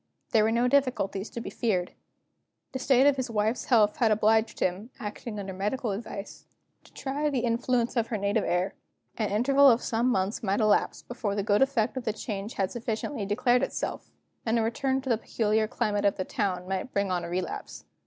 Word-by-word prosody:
There 220 - +4
were 220 - +2
no 235 +2 +2
difficulties 245 -7 +1
to - - -6
be - - -6
feared. 185 -6 -1 0.8
The 260 - -4
state 260 0 +4
of 285 -1 +4
his 260 -2 -2
wife's 220 +2 0
health 215 -4 +4
had 230 - +3
obliged 220 +1 +2
him 185 +6 -1
(acting 210 +1 -6
under 195 -1 -5
medical 210 +5 -2
advice) 200 -1 -7 0.4
to - - -19
try 285 +2 -2
the 265 -4 0
influence 240 +1 0
of 230 -2 +1
her 220 - -2
native 200 +2 0
air. 180 +2 0 0.5
An 215 - 0
interval 275 +6 +5
of 235 -1 +3
some 235 +2 +1
months 190 -2 0
might 200 0 0
elapse 215 -2 +2
before 220 -4 -3
the 200 - -1
good 205 0 +2
effect 260 -2 +1
of 255 - -4
the 220 - 0
change 210 0 -5
had 195 -1 -1
sufficiently 225 -1 -3
declared 240 +4 +2
itself; - - -3 0.3
and 225 0 +1
a 225 - +2
return 265 +4 0
to 265 - -6
the 230 -3 +2
peculiar 215 -1 0
climate 215 -3 -1
of 200 - +2
the 185 - -2
town 180 -2 -2
might 190 +6 -3
bring 200 -1 0
on 175 -1 0
a 170 - -5
relapse. 180 +2 -4
220 Hz, 205 wpm, -28 LUFS, 200-245 Hz, 0.8 s, interval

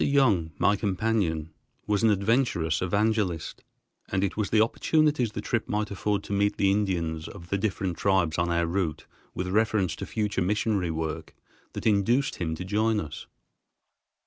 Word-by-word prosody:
Young, 115 - +3
my 100 - +3
companion, 95 -6 -1 0.3
was 105 -1 +1
an 115 - +4
adventurous 100 - +1
evangelist, 100 -3 0 0.5
and 95 0 +1
it 100 - -1
was 105 -2 -1
the 110 - +3
opportunities 130 +1 +2
the 105 - -4
trip 115 +2 -2
might 105 0 -1
afford 100 +1 -1
to - - -5
meet 100 +1 +1
the 100 -1 +3
Indians 85 -6 -1
of 85 -3 -11
the 100 - +1
different 95 -4 -2
tribes 90 -5 +1
on 85 0 +1
our 85 0 +1
route 85 -3 -2 0.3
with 90 - -2
reference 105 -4 +1
to - - -6
future 105 -3 -1
missionary 100 -1 0
work, 80 -1 -4 0.4
that - - -6
induced 115 +6 +2
him 80 -2 -2
to 90 - -6
join 110 +3 +1
us. 80 - -7
100 Hz, 165 wpm, -27 LUFS, 85-110 Hz, 0.5 s, an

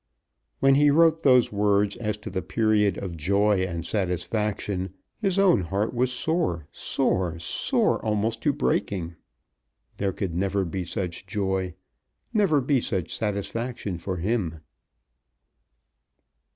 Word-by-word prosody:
When 135 0 +6
he 145 +2 +5
wrote 160 +2 +4
those 125 -5 +5
words 100 0 +2
as 105 -3 -2
to 110 - -5
the 95 0 -2
period 105 +1 +1
of 90 -4 -5
joy 100 +5 +2
and 85 -3 -3
satisfaction 95 0 -2 0.2
his 195 -4 0
own 190 - +5
heart 100 +7 -1
was 125 +1 +1
sore, 125 - -1
sore, 90 -3 0
sore 85 - +1
almost 110 +1 0
to 145 - +2
breaking. 100 - -1 0.8
There 100 -1 0
could 95 -2 -4
never 95 +2 0
be 90 +1 -4
such 90 +1 -4
joy, 95 -3 -2 0.6
never 190 -10 +3
be 130 -1 +2
such 95 -7 -1
satisfaction 105 -1 -3
for 95 +2 -4
him. 90 -4 -1
100 Hz, 125 wpm, -25 LUFS, 90-120 Hz, 0.8 s, When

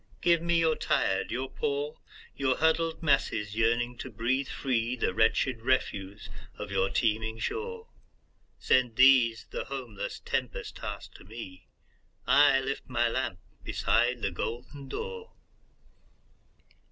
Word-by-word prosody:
"Give 170 -2 +3
me 170 0 +2
your 160 -1 +3
tired, - - 0
your - - -2
poor, 455 +1 -3 0.4
Your 130 -2 +1
huddled 160 +1 +1
masses 135 -8 +1
yearning 120 +2 +1
to - - -5
breathe 130 +4 0
free, 125 -3 -1
The 115 - -1
wretched 115 +3 +2
refuse 100 -6 -1 0.3
of 105 -1 -6
your 95 0 +1
teeming 110 +2 0
shore. 455 - -4 0.7
Send 125 -3 +2
these, 125 -3 +5
the - - -4
homeless, 125 -7 -5
tempest - - -3
tost - - -7
to - - -15
me,I 115 - 0
lift 135 0 -4
my 120 -1 +2
lamp 125 -6 -2 0.3
beside 120 0 +1
the 100 - 0
golden 125 - -5
door!" 465 - -6
125 Hz, 125 wpm, -29 LUFS, 115-145 Hz, 0.7 s, these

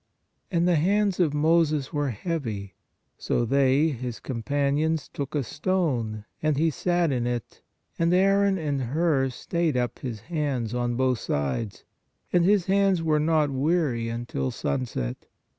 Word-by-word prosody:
And 175 -2 +1
the 175 -2 +4
hands 200 +4 +2
of 170 -5 +3
Moses 155 -1 +2
were 145 -2 0
heavy; 110 - -4 0.5
so 120 - 0
they 140 +4 +3
(his 125 -4 -5
companions) 140 +5 -1
took 140 +1 -5
a 145 - +1
stone, 130 - -1 0.2
and 155 -2 +1
he 160 +2 +2
sat 175 +4 +1
in 120 -2 0
it, 120 -2 -4 0.4
and 170 0 +3
Aaron 195 +1 +3
and 145 -5 -2
Hur 135 +1 +1
stayed 160 +3 -1
up 120 -1 -2
his 115 -5 -5
hands 140 -6 -2
on 120 -1 -1
both 130 -1 +1
sides; 70 - -2 0.5
and 175 - +4
his 195 0 +3
hands 195 -3 +2
were 155 -2 +2
not 155 -1 +2
weary 135 -5 0
until 115 - -3
sunset. 65 - -3
145 Hz, 145 wpm, -26 LUFS, 120-170 Hz, 0.5 s, the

